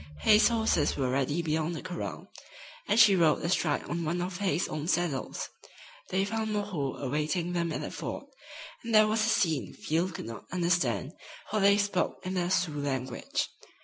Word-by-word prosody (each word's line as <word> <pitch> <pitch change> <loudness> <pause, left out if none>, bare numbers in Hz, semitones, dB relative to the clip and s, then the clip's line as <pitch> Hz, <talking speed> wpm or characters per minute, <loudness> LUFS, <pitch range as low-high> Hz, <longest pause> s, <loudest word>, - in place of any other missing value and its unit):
Hay's 215 +1 +6
horses 220 -10 +1
were 130 -3 0
ready 140 +5 0
beyond 160 +1 -1
the - - -5
corral, 175 - -6 0.6
and 210 +3 +3
she 210 -3 +8
rode 165 -4 +3
astride 170 -3 +1
on 170 0 -3
one 165 +3 -1
of 180 0 -3
Hay's 185 -4 +1
own 155 +1 -4
saddles. 175 -7 -1 0.6
They 190 +1 +1
found 220 +1 -2
"Moreau" 195 -10 -2
awaiting 150 +6 -1
them 170 -1 0
at - - -3
the - - -5
ford, - - -5 0.6
and 230 -1 -1
there 215 0 +8
was 215 0 +1
a 230 - +2
scene 160 - +1
Field 165 +3 -1
could - - -6
not 115 -1 -8
understand, 170 - 0 0.4
for 215 - +1
they 200 0 +5
spoke 200 -2 0
in 185 - -2
the 180 -1 0
Sioux 175 -6 0
language. 130 -3 -2
175 Hz, 180 wpm, -29 LUFS, 150-200 Hz, 0.6 s, she